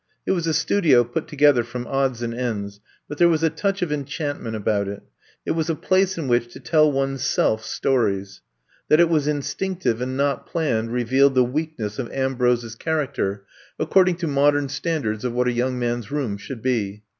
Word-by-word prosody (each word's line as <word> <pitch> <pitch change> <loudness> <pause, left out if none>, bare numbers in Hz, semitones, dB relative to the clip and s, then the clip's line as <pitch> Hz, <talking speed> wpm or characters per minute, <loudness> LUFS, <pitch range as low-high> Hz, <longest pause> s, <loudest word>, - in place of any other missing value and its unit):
It - - 0
was 170 -3 0
a 160 - +1
studio 150 -6 +4
put 125 +7 -4
together 145 -4 +4
from 120 +1 -6
odds 135 -3 -1
and 115 0 -3
ends, 105 -5 -4 0.3
but 150 - -7
there 175 -1 +6
was 160 -1 +1
a 160 - +3
touch 195 +4 -1
of 165 - -2
enchantment 145 -4 -3
about 100 -1 0
it. 100 0 -6 0.4
It - - -1
was 160 0 -1
a 165 - +1
place 190 +2 +1
in 160 -5 -3
which 120 -1 +1
to - - -10
tell 155 +3 +3
one's 135 -1 -1
self 110 -5 +1
stories. 100 -7 -1 0.5
That 155 - +5
it 170 -1 +5
was 155 -3 +1
instinctive 145 -2 -1
and 130 +1 -3
not 140 -1 0
planned 115 -9 -1
re 125 0 0
vealed 135 +3 +4
the 130 - +5
weakness 125 -5 -3
of 120 - -4
Ambrose's 125 -3 0
charac 155 +1 -2
ter, 100 0 -2 0.3
according 185 -2 +3
to 170 -1 -3
modem 145 0 +2
standards 135 -7 -2
of 125 -2 -2
what 125 +1 +1
a - - +2
young 125 +1 -1
man's 120 -2 -2
room 135 -8 -1
should 115 +3 -8
be. 105 -5 -1
135 Hz, 200 wpm, -23 LUFS, 120-155 Hz, 0.5 s, there